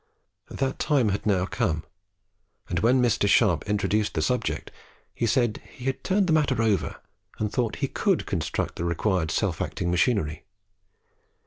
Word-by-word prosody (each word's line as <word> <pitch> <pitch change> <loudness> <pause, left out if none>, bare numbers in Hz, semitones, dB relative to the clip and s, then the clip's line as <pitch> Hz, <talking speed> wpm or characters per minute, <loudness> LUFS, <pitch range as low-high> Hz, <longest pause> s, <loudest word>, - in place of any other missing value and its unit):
That 135 -1 -2
time 140 -8 +2
had 100 +2 -2
now 95 -3 +2
come; 95 -8 -1 0.8
and 85 - -1
when 125 +4 +3
Mr. 115 -4 +2
Sharp 100 -6 +3
introduced 105 +1 0
the 80 - +1
subject, - - -1 0.4
he 115 - -1
said 120 -1 +1
he 125 - -11
had 135 -1 -2
turned 195 +1 +2
the 165 - +2
matter 145 -6 +2
over 105 -6 +1 0.4
and 105 -1 -2
thought 120 -4 0
he - - -2
could 195 +5 0
construct 85 -5 -2
the - - -3
required 85 0 0
self - - -1
acting 85 -1 -2
machinery. 90 -5 +1
105 Hz, 155 wpm, -26 LUFS, 90-125 Hz, 0.8 s, when